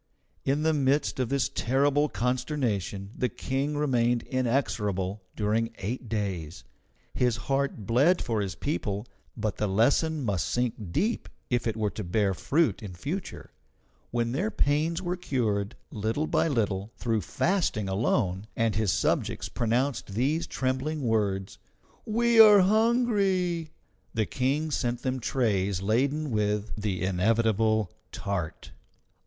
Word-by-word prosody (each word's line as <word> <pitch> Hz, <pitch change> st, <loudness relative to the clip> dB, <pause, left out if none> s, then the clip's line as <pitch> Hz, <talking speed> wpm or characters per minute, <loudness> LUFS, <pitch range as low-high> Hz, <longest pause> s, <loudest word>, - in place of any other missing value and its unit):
In 140 Hz, +3 st, +1 dB
the 160 Hz, 0 st, +3 dB
midst 140 Hz, -1 st, +1 dB
of 125 Hz, -3 st, 0 dB
this 135 Hz, -2 st, +1 dB
terrible 140 Hz, +4 st, +1 dB
consternation 120 Hz, -, -1 dB
the 125 Hz, -, 0 dB
King 135 Hz, +6 st, -2 dB
remained 120 Hz, -5 st, +2 dB
inexorable 105 Hz, -7 st, -1 dB
during 115 Hz, +2 st, 0 dB
eight 115 Hz, +4 st, -4 dB
days. 95 Hz, -7 st, -3 dB, 0.5 s
His 125 Hz, -2 st, +2 dB
heart 135 Hz, -6 st, -1 dB
bled 140 Hz, -, +4 dB
for 115 Hz, -4 st, -1 dB
his 95 Hz, -2 st, -3 dB
people, 105 Hz, -7 st, -2 dB, 0.3 s
but 110 Hz, -1 st, -2 dB
the 105 Hz, -, 0 dB
lesson 140 Hz, +9 st, +2 dB
must 95 Hz, -6 st, 0 dB
sink 110 Hz, -5 st, -2 dB
deep 220 Hz, -, 0 dB, 0.2 s
if 120 Hz, -1 st, +1 dB
it 115 Hz, -1 st, -1 dB
were 105 Hz, -2 st, 0 dB
to 105 Hz, -, -5 dB
bear 95 Hz, +2 st, +1 dB
fruit 155 Hz, -, +1 dB
in 100 Hz, -4 st, -7 dB
future. 155 Hz, -, -5 dB, 0.6 s
When 120 Hz, -1 st, -1 dB
their 180 Hz, -, 0 dB
pains 160 Hz, +1 st, +1 dB
were 175 Hz, 0 st, -1 dB
cured, 110 Hz, -, -1 dB, 0.2 s
little 110 Hz, +8 st, -1 dB
by -, -, +2 dB
little, 105 Hz, -7 st, -1 dB
through 115 Hz, -3 st, 0 dB
fasting 115 Hz, -, 0 dB
alone, 95 Hz, -1 st, 0 dB
and 115 Hz, -1 st, +1 dB
his 105 Hz, -3 st, +1 dB
subjects -, -, 0 dB
pronounced 120 Hz, -2 st, -1 dB
these 150 Hz, +8 st, +1 dB
trembling 135 Hz, +3 st, -2 dB
words, 100 Hz, -5 st, 0 dB, 0.5 s
"We 235 Hz, +1 st, +3 dB
are 210 Hz, -3 st, +10 dB
hungry!" 200 Hz, -6 st, +2 dB, 0.5 s
the 110 Hz, -1 st, +2 dB
King 140 Hz, +7 st, -1 dB
sent 120 Hz, -3 st, -1 dB
them 130 Hz, 0 st, -1 dB
trays 100 Hz, -7 st, 0 dB
laden 140 Hz, +8 st, +1 dB
with 105 Hz, -1 st, 0 dB
the 100 Hz, -4 st, -2 dB
inevitable 110 Hz, +2 st, +2 dB, 0.2 s
tart. 95 Hz, -6 st, -4 dB
120 Hz, 135 wpm, -28 LUFS, 105-145 Hz, 0.6 s, are